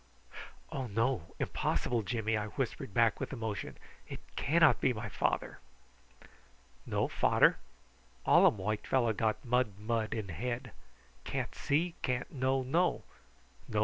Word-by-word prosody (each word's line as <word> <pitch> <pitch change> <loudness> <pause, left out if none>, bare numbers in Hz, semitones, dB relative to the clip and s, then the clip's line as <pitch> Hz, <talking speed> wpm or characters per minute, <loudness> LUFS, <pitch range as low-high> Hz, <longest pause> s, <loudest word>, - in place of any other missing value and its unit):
"Oh 135 -2 -3
no! 115 -4 -1
impossible, 120 -2 0
Jimmy," 110 +2 -1
I 105 0 -1
whispered 120 -2 -3
back 115 +1 +3
with 135 - -4
emotion. 110 -5 -4 0.3
"It - - -6 0.2
cannot 160 +3 +4
be 130 - +3
my 110 -1 -5
father." - - -1 1.3
"No - - +1
fader? - - +4 0.7
All - - +7
um - - +2
white 105 +2 -2
fellow 120 -4 +2
got 110 +2 -1
mud 120 -5 +1
mud 110 +1 -1
in 105 -4 -4
head. 120 - -4 0.5
Can't - - -3
see, 160 +4 0
can't 125 0 -2
know 130 -1 0
know. 170 +8 +1
115 Hz, 130 wpm, -32 LUFS, 110-130 Hz, 1.3 s, All